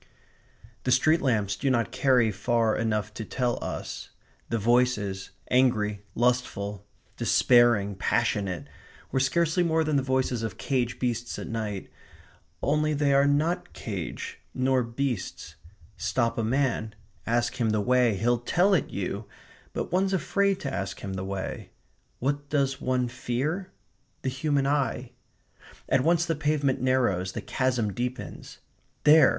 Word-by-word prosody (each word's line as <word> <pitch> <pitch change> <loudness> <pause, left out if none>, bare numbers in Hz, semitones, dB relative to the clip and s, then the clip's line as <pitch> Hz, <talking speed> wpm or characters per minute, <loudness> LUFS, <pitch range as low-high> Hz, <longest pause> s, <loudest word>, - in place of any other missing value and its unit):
The 130 - 0
street 155 +6 +4
lamps 105 -7 +1
do 135 - -1
not 120 -3 +1
carry 125 -5 +3
far 110 +2 +1
enough 105 -2 -1
to 110 - -5
tell 120 +2 -1
us. - - -5 0.4
The 115 - 0
voices, 110 -4 +1 0.2
angry, 110 -5 +2
lustful, 105 -5 0 0.3
despairing, 120 -5 +4
passionate, 100 -3 0 0.4
were 130 - +1
scarcely 165 +6 +2
more 160 -2 +2
than 155 -2 +1
the - - +2
voices 130 -2 0
of 110 -4 -4
caged 125 -3 -1
beasts 120 -1 -2
at - - -5
night. 110 -4 -4 0.8
Only 150 +1 +2
they 140 -1 +2
are 140 +1 +5
not 170 +5 0
caged, 95 -7 -5 0.2
nor 130 0 +2
beasts. 120 -2 -3 0.4
Stop 115 +1 0
a - - +1
man; 115 -3 0 0.3
ask 120 +2 +1
him 115 - +2
the 110 0 +1
way; 125 0 +3
he'll 120 +4 +2
tell 175 +11 +2
it 165 - +2
you; 100 +2 -4 0.5
but - - -4
one's 190 +2 +2
afraid 195 +2 +1
to 140 -2 -3
ask 100 0 -4
him 95 - -5
the 95 0 -3
way. 95 0 -5 0.5
What 145 +2 -2
does 140 -2 0
one 125 -1 +1
fear? 135 +10 -2 0.5
the 130 - 0
human 140 +1 0
eye. 135 -3 0 0.8
At 130 - +3
once 170 +4 +3
the 165 - 0
pavement 145 -4 0
narrows, 120 -9 +1
the - - -4
chasm 125 -6 0
deepens. 125 +5 -5 0.5
There! 155 +1 +8
125 Hz, 145 wpm, -27 LUFS, 110-140 Hz, 0.8 s, There